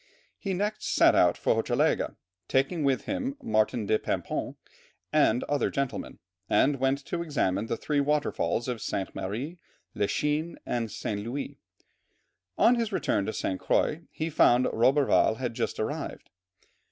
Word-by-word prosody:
He 195 -3 -2
next 210 +3 -2
set - - +6
out - - +4
for - - +2
Hochelaga, - - +1 0.3
taking 135 +5 +1
with 135 -2 +1
him 275 0 -3
Martin 110 +1 +1
de 110 +2 +2
Paimpont - - -3 0.6
and 120 +3 +3
other 145 -1 0
gentlemen, 140 -2 -3 0.3
and 140 -1 +3
went 135 +1 0
to 170 - -3
examine 115 - 0
the 115 - -2
three 145 +4 0
waterfalls 145 -4 0
of 120 -3 -3
Sainte 95 - -3
Marie, 130 - -4 0.3
La 100 - 0
Chine, 150 +6 -1
and 115 -2 -2
St. 105 -1 -4
Louis; 120 +6 -5 1.0
on 240 - +6
his 230 -2 0
return 100 - 0
to - - 0
St. 95 - -2
Croix, 155 - +1
he 160 +1 -4
found 125 -3 +5
Roberval 130 -2 +3
had 125 -2 -3
just 115 0 -3
arrived. - - -4
135 Hz, 150 wpm, -28 LUFS, 115-155 Hz, 1.0 s, set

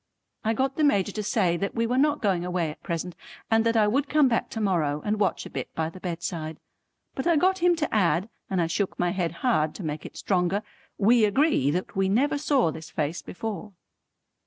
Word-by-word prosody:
I 225 +1 +1
got 265 +3 -1
the 310 - +2
Major 205 -9 +3
to 215 - -4
say 195 -5 +1
that 200 +2 -3
we 230 0 +1
were 245 +2 0
not 295 -1 +2
going 190 -4 +1
away 175 -3 -1
at - - -14
present 170 +1 -3 0.4
and 225 0 +4
that 230 0 +2
I 215 - +5
would 270 +7 +1
come 300 -2 +4
back 235 -2 0
to 225 - -5
morrow 165 -8 +1
and 210 0 0
watch 210 - 0
a - - -7
bit - - -5
by 160 0 -1
the 185 - -11
bedside. 170 -3 -4 0.5
But 265 - -3
I 340 - +4
got 375 +5 +3
him 350 0 +4
to 315 -2 -2
add 180 -2 +2 0.2
and 190 - 0
I 170 - +3
shook 180 +4 -2
my 175 0 +1
head 175 -4 -1
hard 155 -11 +2
to 195 - -7
make 150 -1 -4
it - - -10
stronger 190 +2 0 0.3
"We 225 +3 +4
agree 210 - +3
that 180 +5 -2
we 190 0 +1
never 280 +8 +2
saw 275 - +2
this 160 +1 -9
face 155 +2 -2
before." 210 +1 -6
200 Hz, 225 wpm, -26 LUFS, 170-240 Hz, 0.5 s, I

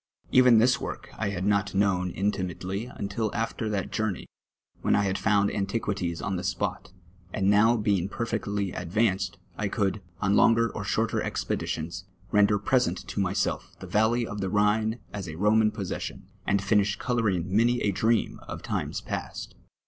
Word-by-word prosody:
Even 125 -2 +7
this 120 +3 +4
work - - -6
I 110 - -1
had 95 -2 -3
not 100 -1 +1
known 95 -2 +2
inti 100 +2 0
mately 95 +6 -4
until 105 +2 -1
afti'r 115 -1 -2
that 100 -3 -2
journey, 110 -4 -2 0.6
Avhen - - +3
I 100 - +3
had 95 -1 0
foimd 100 -2 +2
antiquities 100 -4 -2
on 100 -3 -1
the 90 - -4
spot, 90 - -2 0.4
and 100 0 +2
now 110 +3 +5
being 100 -4 +1
perfectly 100 -4 -2
advanced, 95 0 0 0.2
I 105 - 0
could, 100 0 -1 0.2
on 100 0 +2
longer 115 +1 +4
or 105 - -4
shorter 110 +3 0
expeditions, 85 +3 -3 0.3
render 105 0 +4
present 125 -5 +1
to - - -3
myself 95 0 -1
the - - -8
valley 115 +3 +2
of 105 -2 -5
the 95 - -1
Rhine 110 +3 +2 0.2
as 100 -4 -5
a 80 - -6
Roman 105 +4 +4
possession, - - -5 0.2
and 100 0 +2
finish 100 0 +2
colom 115 -6 +1
ing 90 +2 -3
many 120 +3 +4
a 105 - +2
dream 110 +3 +1
of - - -7
times - - -2
past. - - -5
100 Hz, 170 wpm, -27 LUFS, 95-110 Hz, 0.6 s, Even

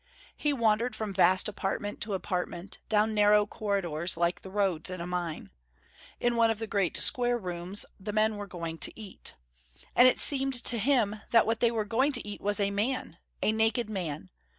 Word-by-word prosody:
He 295 - 0
wandered 230 -2 +1
from 215 -3 -4
vast 185 0 +4
apartment 205 0 -3
to 210 -2 -2
apartment, 180 0 -4
down 215 0 +2
narrow 210 0 +4
corridors 185 -6 -2
like 170 +1 0
the 190 - -10
roads 190 -5 0
in 185 -1 -5
a 170 - -4
mine. 175 -3 -4 0.7
In 240 0 +1
one 230 -1 +4
of 225 - 0
the 225 - -4
great 200 -5 0
square 245 -1 +2
rooms, 180 -1 -1
the 205 +2 -5
men 215 0 +1
were 205 0 -6
going 165 -3 -6
to - - -4
eat. 205 -3 -9 0.6
And 250 - +8
it 255 - +4
seemed 270 -2 +4
to 235 - 0
him 220 -3 +2
that 230 -1 +5
what 225 0 0
they 235 - +4
were 225 -2 -2
going 260 +7 +1
to 245 -5 -2
eat 205 - -7
was 205 +1 0
a 200 -1 +1
man, 210 -3 -2 0.3
naked 220 +1 +1
man. 155 - -4
210 Hz, 190 wpm, -29 LUFS, 185-225 Hz, 0.7 s, And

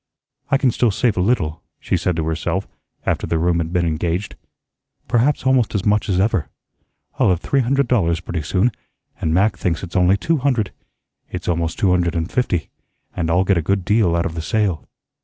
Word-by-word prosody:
"I 135 - +4
can 135 -2 +2
still 120 +1 +2
save 110 +2 +1
a 90 - 0
little," 85 -7 0 0.2
she - - -1
said 90 0 0
to 80 -1 -1
herself, 80 0 -2 0.4
after - - -1
the 85 - 0
room 85 +1 +1
had 80 0 -2
been 90 -1 +1
engaged; 85 +4 -2 0.7
"perhaps 130 +4 +1
almost 130 -5 +2
as 100 - -1
much 105 -1 +2
as 90 -2 +2
ever. 95 - +1 0.7
I'll - - +4
have 90 -2 +2
three 140 - 0
hundred 135 +1 +1
dollars 85 -9 +2
pretty 85 -2 -4
soon, 95 +10 +1 0.5
and 80 - -1
Mac 100 +6 +2
thinks 85 -1 -1
it's 90 - -8
only 90 +2 +4
two 165 +9 0
hundred. 125 -8 0 0.6
It's - - -6
almost 85 -1 -1
two 95 - +2
hundred 90 -2 +1
and 85 +1 -2
fifty; 95 -10 -1 0.4
and 85 -2 -1
I'll 90 +3 +3
get 95 -2 +2
a - - 0
good 95 +3 0
deal 105 -5 +3
out 85 - 0
of 80 - -3
the 80 - -4
sale." 100 - -1
90 Hz, 205 wpm, -20 LUFS, 85-110 Hz, 0.7 s, I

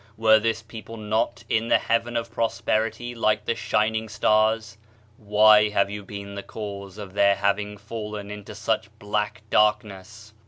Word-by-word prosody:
Were 110 0 +5
this 115 0 -1
people 115 0 -10
not 110 +2 -1
in 115 +1 0
the - - +5
heaven 115 +1 0
of 115 -1 -4
prosperiQr 115 +1 -1
like 105 -1 +1
the - - +1
shining 110 0 0
stars? 110 +1 +1 0.4
Why 105 0 +5
have 100 -1 +1
you 105 0 -6
been 100 0 -8
the 100 - -5
cause 100 -2 -8
of 100 -3 -8
their 100 0 +4
having 100 +1 -1
fallen 105 -1 -7
into 105 0 -9
such 110 0 -1
black 105 0 -3
dark 105 0 +4
ness? 105 +2 -13
105 Hz, 160 wpm, -24 LUFS, 105-110 Hz, 0.4 s, Were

